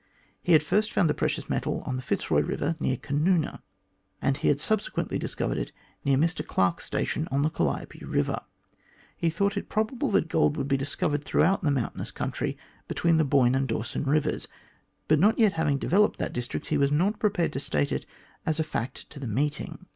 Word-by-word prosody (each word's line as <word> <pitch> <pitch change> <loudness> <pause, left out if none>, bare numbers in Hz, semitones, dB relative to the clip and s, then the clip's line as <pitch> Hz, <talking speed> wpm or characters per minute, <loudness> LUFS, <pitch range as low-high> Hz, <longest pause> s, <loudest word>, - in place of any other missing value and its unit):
He 175 - +3
had 155 - +6
first 210 +8 +1
found 180 - +3
the - - +1
precious - - -1
metal - - -1
on 130 - -2
the 130 - -3
Fitzroy - - +1
Eiver 160 +3 -1
near 130 - +1
Canoona, 150 +5 0 0.6
and 135 - +1
he 140 - -1
had 140 - +3
subsequently 215 +6 -1
discovered - - -2
it - - -4 0.3
near 140 -2 +3
Mr 165 +4 +1
Clarke's 90 -2 +1
station 155 - -1
on 140 +1 +1
the 155 - +1
Calliope - - -2
Eiver. - - -1 0.7
He 170 - +1
thought 200 +5 0
it - - -4
probable 235 +5 0
that 195 -5 +2
gold 150 -1 +2
would - - 0
also 140 - -5
be 135 - +3
discovered 145 +2 -1
throughout 195 +6 +2
the 160 - +1
mountainous 135 -5 -1
country - - -3 0.3
between 165 -1 +2
the 160 - +4
Boyne 135 -3 +4
and 135 0 +1
the 115 - +1
Dawson 115 +5 -3
Eivers, 150 +2 +1 0.6
but 155 -1 +4
not 205 +6 +4
yet 215 -4 +4
having 155 -3 +1
developed 200 +9 +3
that - - -3
district, 120 0 -4
he - - +2
was 140 0 +3
not 185 +8 +2
prepared 200 -5 +1
to - - -2
state 75 - 0
it - - -2 0.4
as 160 0 -1
a - - +3
fact 130 -5 -4
to 145 - -9
the 135 - -5
meeting. 145 - -2
150 Hz, 205 wpm, -27 LUFS, 135-175 Hz, 0.7 s, had